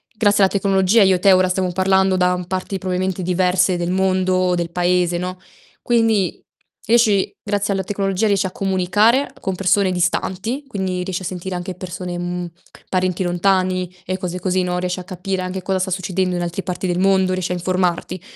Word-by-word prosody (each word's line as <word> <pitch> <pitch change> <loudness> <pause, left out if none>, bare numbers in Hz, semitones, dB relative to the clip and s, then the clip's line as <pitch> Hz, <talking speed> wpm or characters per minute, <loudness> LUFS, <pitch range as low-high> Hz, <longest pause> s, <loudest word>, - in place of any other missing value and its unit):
grazie 205 -2 +3
alla 190 - +3
tecnologia 195 +1 +3
io 190 -1 +4
e - - -2
te 195 +1 +5
ora 185 0 +4
stiamo 185 -1 0
parlando 190 +1 +2
da 180 0 +1
parti 185 +1 -3
probabilmente 185 0 -2
diverse 180 0 +2
del 175 +1 -2
mondo 185 0 +1
o 180 -1 +2
del 170 -1 -3
paese, 175 0 +1
no, 180 +1 -4 0.4
quindi 225 -5 +1 0.4
riesci 220 -4 +3
grazie 205 -1 -1
alla 190 - -1
tecnologia 195 +2 -1
riesci 200 -1 +2
a 185 - -3
comunicare 200 +8 +2
con 190 -1 -2
persone 195 0 +2
distanti, 190 +8 -1
quindi 185 -5 -3
riesci 185 0 -4
a - - -6
sentire 185 +1 -5
anche 180 +1 -5
persone, 180 -1 -6
mhmm, 175 0 -3 0.4
parenti 185 0 0
lontani 185 0 0
e 185 0 -2
cose 180 -1 -4
così, 185 0 0
no, 180 0 -1
riesci 180 0 -2
a - - -7
capire 185 +1 -4
anche 185 +1 -4
cosa 190 +1 -1
sta 190 0 -2
succedendo 185 0 -1
in - - -2
altre 175 +2 -3
parti 180 +1 -3
del 175 0 -1
mondo, 190 -1 +3
riesci 185 -1 -2
a - - 0
informarti. 180 0 -1
185 Hz, 190 wpm, -20 LUFS, 180-195 Hz, 0.4 s, te